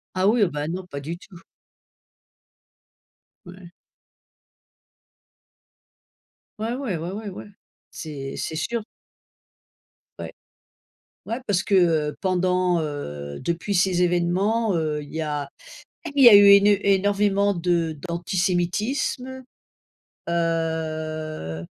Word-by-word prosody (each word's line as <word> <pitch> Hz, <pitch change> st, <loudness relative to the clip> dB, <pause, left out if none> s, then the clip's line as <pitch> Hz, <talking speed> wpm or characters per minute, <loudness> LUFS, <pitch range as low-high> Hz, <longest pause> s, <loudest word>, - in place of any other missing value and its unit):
Ah, 185 Hz, +1 st, +2 dB
oui, 225 Hz, +2 st, +3 dB
oh 190 Hz, -, +2 dB
ben, 150 Hz, -1 st, -4 dB
non, 185 Hz, +1 st, -5 dB
pas 140 Hz, -4 st, -6 dB
du 160 Hz, +5 st, -6 dB
tout. 180 Hz, -1 st, -15 dB, 2.1 s
Ouais. 180 Hz, -1 st, -12 dB, 2.9 s
Ouais, 225 Hz, +2 st, -2 dB
ouais. 250 Hz, -10 st, -3 dB
Ouais, 170 Hz, +3 st, -5 dB
ouais. 210 Hz, +1 st, -6 dB
Ouais. 195 Hz, -, -9 dB, 0.4 s
C'est 140 Hz, -4 st, -7 dB
c'est 160 Hz, -, -4 dB
sûr. 230 Hz, +8 st, -2 dB, 1.4 s
Ouais. -, -, -6 dB, 1.0 s
Ouais, 230 Hz, +3 st, -3 dB
parce 190 Hz, -2 st, +1 dB
que 200 Hz, -, -1 dB
heu, 160 Hz, -5 st, +2 dB
pendant, 180 Hz, -2 st, +1 dB
heu, 75 Hz, -, -5 dB
depuis 170 Hz, +4 st, -2 dB
ces 180 Hz, -1 st, +2 dB
évènements, 185 Hz, +5 st, +1 dB
heu, 155 Hz, -2 st, -1 dB
il 145 Hz, -, -12 dB
y 160 Hz, -, -2 dB
a 145 Hz, -2 st, -3 dB, 0.7 s
il 275 Hz, -, +5 dB
y 240 Hz, -, +11 dB
a 210 Hz, -, +9 dB
eu 200 Hz, -, +8 dB
éne 200 Hz, 0 st, +7 dB, 0.2 s
énorvément 200 Hz, +1 st, +2 dB
de 170 Hz, -2 st, 0 dB
d'antisémitisme, 190 Hz, +9 st, -1 dB, 0.9 s
heu, 155 Hz, -, -2 dB
175 Hz, 110 wpm, -23 LUFS, 160-200 Hz, 2.9 s, y